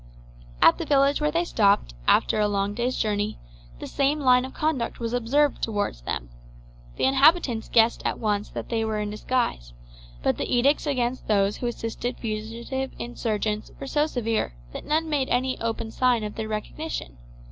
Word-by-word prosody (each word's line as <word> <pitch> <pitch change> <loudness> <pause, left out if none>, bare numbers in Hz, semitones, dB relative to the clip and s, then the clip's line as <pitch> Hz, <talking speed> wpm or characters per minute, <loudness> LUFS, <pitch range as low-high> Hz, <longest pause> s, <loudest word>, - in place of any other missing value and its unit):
At 165 - +6
the 335 - -2
village 280 0 +3
where 300 - +2
they 335 +3 +1
stopped, 200 - +2
after 215 - +4
a 210 - +3
long 200 0 0
day's 245 +4 -1
journey, 210 0 -1 0.4
the - - -7
same 280 +2 +1
line 255 -2 +4
of 265 - -9
conduct 300 -7 -1
was 230 0 -3
observed 270 +5 +2
towards 205 - -2
them. - - -4 0.6
The - - -3
inhabitants 270 -3 +4
guessed 230 0 +4
at - - -1
once 210 -2 -1
that - - -6
they 225 -1 0
were 220 -1 -1
in 210 0 -2
disguise; 215 - -2 0.5
but - - +1
the - - -3
edicts 275 +5 +3
against 255 -2 -1
those 200 -1 +2
who 245 - -3
assisted 240 +1 -4
fugitive 230 +4 -4
insurgents 215 -3 -2
were 275 - -5
so 295 +2 +1
severe 225 - -1 0.2
that - - -7
none 315 +2 +1
made 290 -4 0
any 255 +1 0
open 225 0 -3
sign 245 -2 +2
of 210 0 -4
their 220 -1 -4
recognition. 215 - -5
235 Hz, 175 wpm, -25 LUFS, 215-265 Hz, 0.6 s, At